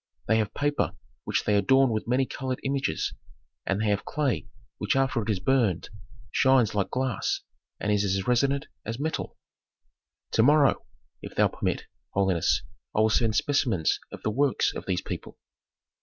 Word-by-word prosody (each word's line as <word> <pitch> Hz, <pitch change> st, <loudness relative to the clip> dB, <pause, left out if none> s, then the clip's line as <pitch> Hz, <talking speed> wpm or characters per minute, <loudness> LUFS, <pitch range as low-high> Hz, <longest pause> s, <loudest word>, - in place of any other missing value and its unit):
They 110 Hz, -, +4 dB
have 105 Hz, -2 st, -2 dB
paper 145 Hz, 0 st, 0 dB, 0.3 s
which -, -, 0 dB
they 105 Hz, -, +2 dB
adorn 130 Hz, +6 st, +4 dB
with 110 Hz, 0 st, -2 dB
many 130 Hz, +2 st, +2 dB
colored 130 Hz, 0 st, -4 dB
images, 135 Hz, -, -1 dB, 0.5 s
and 95 Hz, -, +1 dB
they 110 Hz, 0 st, +1 dB
have 100 Hz, 0 st, +1 dB
clay 130 Hz, -, -1 dB, 0.3 s
which 105 Hz, -, 0 dB
after 135 Hz, -3 st, +2 dB
it 105 Hz, -, -5 dB
is 100 Hz, -4 st, +1 dB
burned 115 Hz, -8 st, +1 dB, 0.4 s
shines 130 Hz, -4 st, +4 dB
like 100 Hz, -2 st, 0 dB
glass, 130 Hz, -4 st, -1 dB, 0.4 s
and 105 Hz, -, -1 dB
is 105 Hz, -1 st, +2 dB
as 95 Hz, -1 st, 0 dB
resonant 135 Hz, +3 st, +2 dB, 0.2 s
as 115 Hz, +1 st, -4 dB
metal. 160 Hz, +2 st, -3 dB, 0.9 s
"To -, -, +3 dB
morrow, 145 Hz, +3 st, +4 dB, 0.3 s
if -, -, -9 dB
thou -, -, +4 dB
permit, -, -, -2 dB, 0.3 s
holiness, 95 Hz, -4 st, +2 dB, 0.3 s
I 110 Hz, -, +4 dB
will 110 Hz, -, +4 dB
send 110 Hz, 0 st, +2 dB
specimens 115 Hz, -, +1 dB
of -, -, -9 dB
the 110 Hz, -, 0 dB
works 140 Hz, +4 st, +2 dB
of -, -, -7 dB
these 90 Hz, -1 st, 0 dB
people." -, -, -7 dB
115 Hz, 165 wpm, -27 LUFS, 105-135 Hz, 0.9 s, They